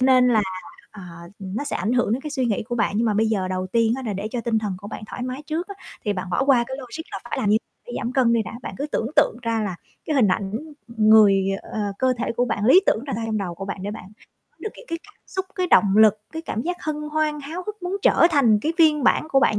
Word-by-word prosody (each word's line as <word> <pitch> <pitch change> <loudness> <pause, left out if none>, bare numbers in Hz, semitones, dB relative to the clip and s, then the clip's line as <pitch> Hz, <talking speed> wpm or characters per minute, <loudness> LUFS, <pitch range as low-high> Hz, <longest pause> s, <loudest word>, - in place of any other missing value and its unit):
nên 255 -1 +5
là, 225 -3 +4 0.5
à, 200 - -11 0.4
nó 195 +8 -4
sẽ 285 - -2
ảnh 210 +7 -1
hưởng 245 -4 +2
đến 245 - 0
cái 300 +1 -6
suy 265 -3 -1
nghĩ 215 -4 0
của 240 +3 -5
bạn. 230 -4 +1
Nhưng 230 +2 +2
mà 210 - +1
bây 220 +2 +2
giờ 195 -4 0
đầu 185 0 -2
tiên 225 +3 +2
á, 265 - -6
là 215 - -1
để 200 +2 -4
cho 245 - -2
tinh 230 -1 0
thần 210 -3 -3
của 200 +2 -9
bạn - - -7
thoải 245 - -6
mái 255 +3 -4
trước 325 +5 -3
á, 400 - -7 0.3
thì 210 - +1
bạn 185 -2 -5
bỏ 185 +10 +1
qua 260 -4 +4
cái 265 +1 -5
logic 265 +5 -7
là - - -3
phải - - -4
làm 215 - 0
như 215 - +5 0.3
phải 240 - -7
giảm 240 0 -3
cân 250 -3 +3
đi 230 -1 +2
đã. 215 - -8
Bạn - - -6
cứ 285 - -2
tưởng 225 - -2
tượng - - +4
ra 230 -1 0
là 195 -4 -3 0.3
cái 310 - -1
hình 235 -6 +4
ảnh 195 +1 -1 0.3
người, 215 -4 +5 0.2
ờ, - - -14
ờ, 205 -2 -2
cơ 260 0 +3
thể - - -1
của 245 +1 +1
bạn 215 -4 -2
lý 265 - +7
tưởng 225 - +2
ra - - -4
trong 220 -1 -1
đầu 180 -4 -4
của 195 - -7
bạn, 195 - -5
để 200 - -3
bạn 210 -3 -8 0.5
có - - -41
được 435 - -3
cái - - -13
cái 335 - -3
cảm 415 - -18
xúc, 380 0 -4
cái 365 -2 0
động 205 - +4
lực, 215 -1 +6
cái 320 0 -5
cảm 230 -8 -3
giác 355 +4 -2
hân 310 -1 -2 0.2
hoan, 305 -1 0
háo 320 +6 -6
hức 425 -2 -7
muốn 360 +2 -2
trở - - +5
thành 250 -9 +4
cái 320 - 0
phiên 305 -4 +4
bản 310 - +3
của 270 - +3
bạn 210 - +3
235 Hz, 290 wpm, -23 LUFS, 210-285 Hz, 0.5 s, lý